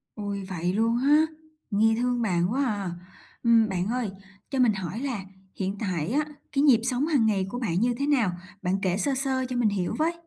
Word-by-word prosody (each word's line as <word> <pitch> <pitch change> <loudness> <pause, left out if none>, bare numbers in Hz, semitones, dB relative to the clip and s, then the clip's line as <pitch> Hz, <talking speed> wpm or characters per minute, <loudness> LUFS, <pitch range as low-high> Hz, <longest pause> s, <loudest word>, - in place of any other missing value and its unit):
Ôi, 200 -2 -4
vậy 175 0 -1
luôn 225 +2 +2
ha, 290 +5 +5 0.5
nghe 220 +2 +3
thương 245 -1 +1
bạn 180 -3 +1
quá 275 +1 +1
à. 205 -7 -2 0.5
Ừm, 230 -2 +5
bạn 185 0 -1
ơi, 240 -3 -1 0.4
cho 270 -2 -2
mình 235 -4 +5
hỏi 190 +3 -4
là 250 -8 -3 0.3
hiện 195 0 -2
tại 180 -6 -2
á, 295 +4 +1 0.3
cái 275 - +1
nhịp 260 -6 +5
sống 255 +4 0
hàng 285 -8 +3
ngày 200 -3 +2
của 245 - -4
bạn 185 -5 0
như 245 +1 +2
thế 280 - +1
nào? 245 -11 +3 0.3
Bạn 190 0 0
kể 185 -1 +1
sơ 275 +6 0
sơ 260 -1 0
cho 250 - -3
mình 240 -3 +3
hiểu 190 -3 -2
với. 330 +2 +2
225 Hz, 215 wpm, -26 LUFS, 195-255 Hz, 0.5 s, ha